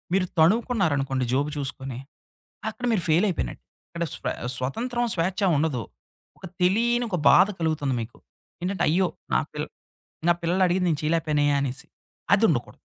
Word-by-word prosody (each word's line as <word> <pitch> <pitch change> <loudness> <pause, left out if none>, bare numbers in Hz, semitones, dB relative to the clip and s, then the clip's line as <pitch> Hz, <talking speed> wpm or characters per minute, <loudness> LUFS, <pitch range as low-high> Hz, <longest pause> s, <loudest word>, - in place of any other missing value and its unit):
మీరు 190 -1 +2
తణువుకున్నారనుకోండి 160 - +2
జేబు 140 +3 +1
చూసుకొని, 135 -2 -4 0.7
అక్కడ 245 +3 -6
మీరు 205 -6 +1
ఫెయిలైయిపోయినట్టు. 165 - +1 0.3
అక్కడ 170 0 -3
స్వ - - -6 0.3
స్వతంత్రం 240 - -2
స్వేచ్ఛ 185 +4 -1 0.2
ఉండదు, 140 -6 0 0.6
ఒక - - -9 0.2
తెలియని 235 +6 +2
ఒక 180 - -1
బాధ 185 +2 +7
కలుగుతుంది 150 -5 0
మీకు. 115 +1 -8 0.5
ఏంటంటే 190 +2 -1
అయ్యో! 180 +4 +3 0.3
నా - - +5
పిల్ - - -3 0.6
నా - - +5
పిల్లలు 175 +3 +1
అడిగింది 180 0 +1
నేను 150 -2 -1
చయలేకపోయనే 155 -2 +1 0.2
అనేసి, 130 -2 -4 0.5
అదుండకూడదు. - - +1
165 Hz, 135 wpm, -25 LUFS, 140-190 Hz, 0.7 s, బాధ